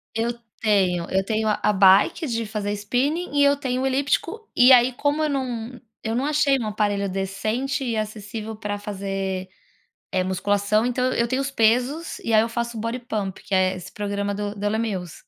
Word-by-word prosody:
Eu 230 Hz, +1 st, 0 dB, 0.3 s
tenho. 185 Hz, -6 st, +2 dB
Eu 190 Hz, 0 st, +1 dB
tenho 220 Hz, +1 st, -1 dB
a 210 Hz, 0 st, +1 dB
bike 195 Hz, -, +5 dB
de 230 Hz, -2 st, -2 dB
fazer 210 Hz, -1 st, -3 dB
spinning 280 Hz, -, -1 dB
e 285 Hz, -, +5 dB
eu 280 Hz, 0 st, +5 dB
tenho 255 Hz, -2 st, -2 dB
o -, -, 0 dB
elíptico. 285 Hz, -, -1 dB
E 250 Hz, +2 st, +7 dB
aí, 250 Hz, 0 st, +6 dB
como 290 Hz, +4 st, 0 dB
eu 305 Hz, -, +1 dB
não 250 Hz, -3 st, -3 dB, 0.2 s
eu 225 Hz, +1 st, -2 dB
não 260 Hz, -, 0 dB
achei 295 Hz, -2 st, +3 dB
um 225 Hz, -4 st, -3 dB
aparelho 205 Hz, -2 st, 0 dB
decente 215 Hz, +9 st, -2 dB
e 235 Hz, -3 st, -1 dB
acessível 215 Hz, +1 st, -5 dB
para 205 Hz, -1 st, -4 dB
fazer, 195 Hz, -2 st, -4 dB, 0.6 s
eh, 185 Hz, -1 st, +1 dB
musculação. 205 Hz, +3 st, +1 dB
Então, 250 Hz, +1 st, 0 dB
eu 235 Hz, 0 st, +1 dB
tenho 260 Hz, +2 st, -1 dB
os 275 Hz, 0 st, -2 dB
pesos 250 Hz, +7 st, +1 dB
e 230 Hz, -, -2 dB
aí 215 Hz, -, +7 dB
eu 230 Hz, -, -1 dB
faço 235 Hz, 0 st, -3 dB
o -, -, -4 dB
bodypump, 230 Hz, -5 st, -4 dB
que 200 Hz, -, -6 dB
é 185 Hz, 0 st, +3 dB
esse 180 Hz, -, -9 dB
programa 200 Hz, -1 st, -2 dB
do 205 Hz, +1 st, -4 dB
do 205 Hz, +1 st, -2 dB
Les 220 Hz, +1 st, 0 dB
Mills. 185 Hz, -7 st, -3 dB
220 Hz, 195 wpm, -23 LUFS, 200-255 Hz, 0.6 s, E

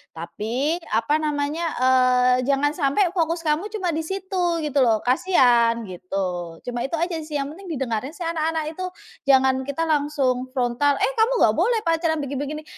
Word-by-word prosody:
"Tapi," 240 Hz, -, -2 dB
apa 230 Hz, +8 st, +1 dB
namanya, 300 Hz, +2 st, -2 dB
eee, 255 Hz, -1 st, +4 dB
"Jangan 280 Hz, +1 st, +2 dB
sampai 335 Hz, +5 st, +1 dB
fokus 335 Hz, -2 st, -1 dB
kamu 310 Hz, +7 st, 0 dB
cuma 385 Hz, -5 st, -2 dB
di 315 Hz, -, -1 dB
situ," 365 Hz, -3 st, -2 dB
gitu 290 Hz, -1 st, 0 dB
loh, 225 Hz, -3 st, +2 dB
"kasihan," 245 Hz, -5 st, +3 dB
gitu. 180 Hz, -2 st, -4 dB
Cuma 240 Hz, -1 st, -3 dB
itu 335 Hz, -, -3 dB
aja 340 Hz, 0 st, -1 dB
sih 305 Hz, -1 st, -7 dB
yang 280 Hz, +1 st, -3 dB
penting 385 Hz, +2 st, -12 dB
didengarin 255 Hz, +3 st, -3 dB
sih 355 Hz, -, -6 dB
anak-anak 320 Hz, -1 st, -1 dB
itu. 370 Hz, -, -2 dB, 0.4 s
Jangan 265 Hz, -1 st, +4 dB
kita 280 Hz, +4 st, -2 dB
langsung 285 Hz, -5 st, 0 dB
frontal, 255 Hz, +3 st, +1 dB
"Eh, -, -, +2 dB
kamu 455 Hz, +3 st, +4 dB
nggak -, -, +4 dB
boleh 470 Hz, -2 st, +2 dB
pacaran 330 Hz, -1 st, +1 dB
begi-begini." 285 Hz, +3 st, -4 dB
290 Hz, 165 wpm, -23 LUFS, 250-330 Hz, 0.4 s, eee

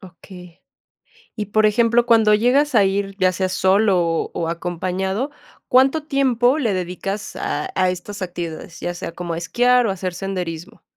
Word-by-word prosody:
Okey. 180 Hz, -1 st, -14 dB, 0.8 s
Y, 210 Hz, -2 st, -3 dB
por 215 Hz, +1 st, +2 dB
ejemplo, 235 Hz, +2 st, +3 dB
cuando 225 Hz, -3 st, +4 dB
llegas 255 Hz, +6 st, +2 dB
a 210 Hz, -, +6 dB
ir, 195 Hz, 0 st, -1 dB
ya 185 Hz, -1 st, +3 dB
sea 185 Hz, +1 st, -1 dB
solo, 185 Hz, -3 st, +2 dB
o, 165 Hz, -, -2 dB
acompañado, 185 Hz, -, -3 dB, 0.4 s
¿cuánto 265 Hz, +5 st, +3 dB
tiempo 265 Hz, -3 st, +2 dB
le 235 Hz, -9 st, 0 dB
dedicas 185 Hz, +3 st, -4 dB
a 150 Hz, -, -3 dB
a 185 Hz, -1 st, +2 dB
estas 200 Hz, +3 st, -6 dB
actividades? 170 Hz, -2 st, -6 dB
Ya 175 Hz, -, -3 dB
sea 175 Hz, -, -6 dB
como 175 Hz, 0 st, -5 dB
a -, -, -3 dB
esquiar, 245 Hz, +8 st, +2 dB
o, -, -, 0 dB
hacer 185 Hz, -1 st, -4 dB
senderismo. 180 Hz, +1 st, -6 dB
195 Hz, 160 wpm, -20 LUFS, 180-230 Hz, 0.8 s, a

